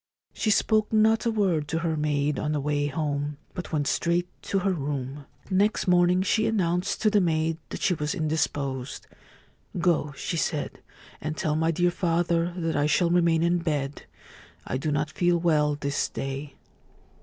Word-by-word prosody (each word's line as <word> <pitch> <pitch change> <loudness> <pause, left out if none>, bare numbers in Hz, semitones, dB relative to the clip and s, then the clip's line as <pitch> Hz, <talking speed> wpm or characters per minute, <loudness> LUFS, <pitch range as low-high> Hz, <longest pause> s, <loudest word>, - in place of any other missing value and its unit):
She 220 - -1
spoke 215 0 +2
not 220 +2 +3
a - - +2
word 185 -9 +1
to 165 - -1
her 165 -2 0
maid 150 -1 0
on 150 0 -1
the 150 - 0
way 145 0 0
home, 145 0 -2 0.2
but 180 - -6
went 150 -3 0
straight 170 +5 +1
to 195 - -1
her 195 0 +1
room. 140 -2 -4 0.2
Next 200 +3 +2
morning 180 +1 +4
she 215 +3 +2
announced 180 -2 0
to 215 - +4
the 205 -1 +4
maid 160 -1 0
that - - -6
she 185 - +3
was 150 -2 -2
indisposed. 145 -4 -2 0.4
' - - -35 0.3
Go,' 170 -4 +1
she 170 - -3
said, 155 -2 -2 0.2
' - - -22
and 155 +1 -4
tell 150 -1 0
my 160 +1 +1
dear 175 +2 +2
father 170 0 +1
that 165 -2 -1
I 145 +1 +2
shall 170 +2 +2
remain 170 -2 +3
in 175 +1 +2
bed. 145 -4 -3 0.6
I - - -2
do 150 +3 -2
not 150 +1 -1
feel 175 +1 +2
well 150 -3 +2
this 140 -1 -1
day.' 135 +1 -5
160 Hz, 180 wpm, -26 LUFS, 145-175 Hz, 0.6 s, morning